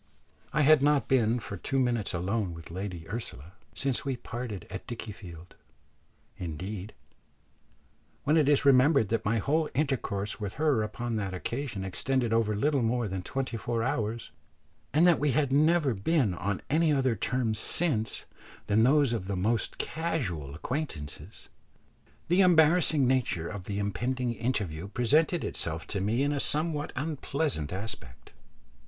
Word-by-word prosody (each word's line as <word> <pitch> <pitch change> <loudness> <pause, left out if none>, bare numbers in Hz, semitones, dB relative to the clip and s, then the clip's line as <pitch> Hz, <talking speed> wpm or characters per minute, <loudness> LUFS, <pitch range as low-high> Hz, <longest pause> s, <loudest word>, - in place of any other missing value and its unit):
I 150 - +2
had 155 0 +6
not 145 0 +3
been 120 -3 +3
for 100 -3 -7
two 135 - -2
minutes 120 -5 +1
alone 95 +1 -1
with 80 0 -11
Lady 90 -2 -5
Ursula 90 - -6 0.2
since 135 -3 -1
we 135 -3 -2
parted 120 -5 -6
at 95 - -7
Dickiefield; 100 -7 -8 0.8
indeed, 90 +5 -6 1.3
when 150 +3 +3
it 150 -3 +4
is 145 -1 +3
remembered 135 -3 +5
that 115 -1 0
my 115 +2 +1
whole 150 +7 +1
intercourse 120 -9 -1
with 100 -3 -4
her 150 -6 +2
upon 115 +2 -3
that 100 -3 -3
occasion 115 +1 -4
extended 120 +5 -1
over 110 -2 +2
little 140 +5 +1
more 120 0 0
than 95 -1 -3
twenty 130 +4 -3
four 115 0 -2
hours, 115 -2 -2 0.6
and 155 +4 +4
that 175 -4 +5
we 145 -2 +1
had 140 -1 +1
never 155 -1 +4
been 110 - +1
on 95 +3 -3
any 155 +2 +3
other 130 -4 +2
terms 115 0 -1
since 115 -7 0 0.4
than 105 +1 +3
those 135 +1 +4
of 100 -5 -3
the 100 - -2
most 110 +5 0
casual 95 - -2
acquaintances, 85 - -5 0.8
the 180 +3 +4
embarrassing 160 -4 +5
nature 120 -10 +1
of 95 -1 -7
the 100 0 -3
impending 120 +5 -1
interview 100 -8 -2
presented 150 - +2
itself 80 0 -3
to 100 - -3
me 110 +7 +1
in 145 - +1
a 145 - -1
somewhat 150 +1 +1
unpleasant 140 - -2
aspect. 95 - -5
115 Hz, 150 wpm, -29 LUFS, 100-140 Hz, 1.3 s, had